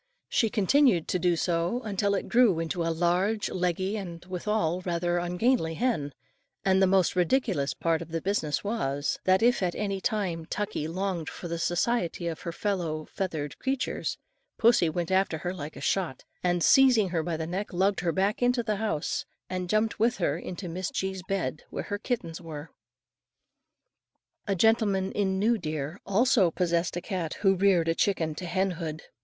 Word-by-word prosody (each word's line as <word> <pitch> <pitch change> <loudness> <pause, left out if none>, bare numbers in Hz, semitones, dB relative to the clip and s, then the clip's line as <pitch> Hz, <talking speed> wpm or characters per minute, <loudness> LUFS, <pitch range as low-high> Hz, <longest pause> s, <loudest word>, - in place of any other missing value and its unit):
She 225 - +2
continued 215 - +3
to 180 - +1
do 175 0 +2
so 175 +8 0
until 200 -1 0
it - - -3
grew 235 -8 +4
into 165 +2 -2
a 165 - 0
large, 180 +6 +1
leggy, 185 +3 -1
and 175 -4 -7
withal 185 -1 -1
rather 175 0 0
ungainly 175 0 +1
hen; 155 - -1 0.5
and 190 0 +4
the 190 - +5
most 190 -1 +3
ridiculous 180 - +1
part 165 -1 0
of 165 - -8
the 165 0 -2
business 160 -5 -1
was, 145 -10 -1
that 190 +3 +4
if 245 0 +4
at 180 -2 0
any 195 -2 -2
time 185 -8 -1
Tuckie 205 -5 -2
longed 180 -1 -2
for 175 - -7
the 170 0 -3
society 175 0 0
of 165 -1 -3
her 170 - -4
feathered 165 -5 -2
fellow 160 -6 -2
creatures, 265 -1 -2 0.4
pussy 230 -7 +4
went 170 +2 -3
after 190 -3 +2
her 175 +3 -3
like 150 -4 -7
a - - -9
shot, 175 -9 -1 0.2
and 175 -1 +1
seizing 250 -7 +6
her 170 -2 0
by 165 0 -2
the 160 - -3
neck 185 +5 -4
lugged 195 +2 +1
her 175 -1 0
back 195 +6 0
into 245 0 +2
the 215 -2 -1
house, 210 -8 -2 0.2
and 185 -1 -3
jumped 215 +2 +1
with 235 +3 +2
her 160 -6 +1
into 180 +2 -6
Miss 180 +2 -3
G.'s 190 -1 -3
bed 180 -7 -2
where - - -4
her 205 - -4
kittens 210 -9 -3
were. 160 -2 -8 1.8
A 200 - +1
gentleman 200 -2 +2
in 190 -2 0
New 220 +3 +2
Deer, 155 +2 -4
also 205 -2 +4
possessed 170 0 0
a - - -3
cat 180 -6 -3
who 195 -2 +5
reared 185 -3 +3
a 165 - +3
chicken 165 -4 0
to 175 +4 -6
hen 190 +2 +1
hood. 160 -2 -5
185 Hz, 180 wpm, -28 LUFS, 165-205 Hz, 1.8 s, seizing